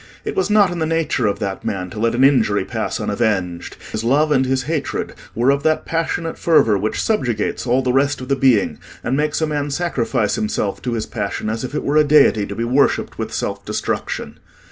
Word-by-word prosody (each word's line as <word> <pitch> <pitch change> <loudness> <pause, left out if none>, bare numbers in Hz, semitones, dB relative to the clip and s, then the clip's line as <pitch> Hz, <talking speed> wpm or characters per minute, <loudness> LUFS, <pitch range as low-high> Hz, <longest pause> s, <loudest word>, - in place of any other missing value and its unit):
It - - -3
was 390 - 0
not 205 -3 +4
in 175 - -4
the 160 - 0
nature 160 -7 0
of 100 - 0
that 95 -1 -4
man 90 -3 -3
to 105 - -7
let 115 +1 +1
an 130 - +3
injury 120 -7 +3
pass - - -3
unavenged: 100 -5 -1
his 110 - -3
love 145 +6 +2
and 130 -2 +3
his 130 0 0
hatred 150 +1 -3 0.2
were 120 +4 +3
of 140 0 0
that 155 +1 +1
passionate 165 0 -2
fervour 155 -10 +4
which 105 +2 -1
subjugates 120 - -1
all 125 +2 +2
the 125 -1 +1
rest 140 +2 +2
of 130 - -7
the 140 - +2
being, 130 -7 +2 0.2
and 125 - 0
makes 150 +2 0
a - - +3
man 145 -1 -2
sacrifice 135 - 0
himself 105 -2 -2
to 125 - -2
his 110 -2 -2
passion 105 +1 -3
as 115 +2 -4
if 130 +3 -5
it - - -2
were 145 +2 +1
a 155 - +6
deity 145 -8 +4
to 100 - -6
be 115 - -2
worshipped 130 +4 +1
with - - -3
self - - -3
destruction. - - -3
130 Hz, 220 wpm, -19 LUFS, 110-150 Hz, 0.2 s, a